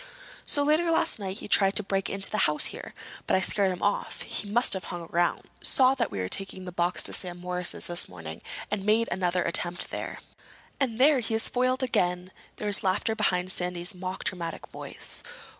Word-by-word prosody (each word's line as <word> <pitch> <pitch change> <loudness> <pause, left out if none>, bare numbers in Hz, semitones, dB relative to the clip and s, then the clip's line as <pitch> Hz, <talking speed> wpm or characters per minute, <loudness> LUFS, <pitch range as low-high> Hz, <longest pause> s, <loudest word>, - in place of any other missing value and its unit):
So 290 - +2
later 310 +4 +3
last 325 - +2
night 195 -1 -4
he - - -7
tried 195 -1 +4
to 210 - +1
break 195 0 -1
into 195 0 +3
the 215 - 0
house 150 0 +2
here, - - -9 0.3
but - - +3
I - - +4
scared 195 +1 +4
him 180 - -5
off. 205 - -1
He 205 - -5
must 240 +4 +4
have 190 - -3
hung 175 -1 -6
around, 175 +1 +1 0.2
saw 260 0 +4
that - - -1
we - - -6
were 90 -1 -1
taking 190 - -1
the 180 - -6
box 175 0 0
to - - -2
Sam 180 -2 -1
Morris's 180 0 -1
this 175 0 -1
morning, 80 -2 -9 0.3
and 210 -2 -1
made 220 +3 +3
another 180 0 +1
attempt 175 +1 -1
there." - - -5 0.6
"And 250 -5 0
there 275 +2 +5
he 225 -1 -2
is 225 - +3
foiled 255 +1 +1
again!" 180 -6 0 0.2
There - - -6
was 205 -1 +3
laughter 195 +3 +1
behind 180 -3 +1
Sandy's 180 +1 -1
mock 185 +1 -5
dramatic 170 -3 -4
voice. - - -2
190 Hz, 205 wpm, -27 LUFS, 180-220 Hz, 0.6 s, there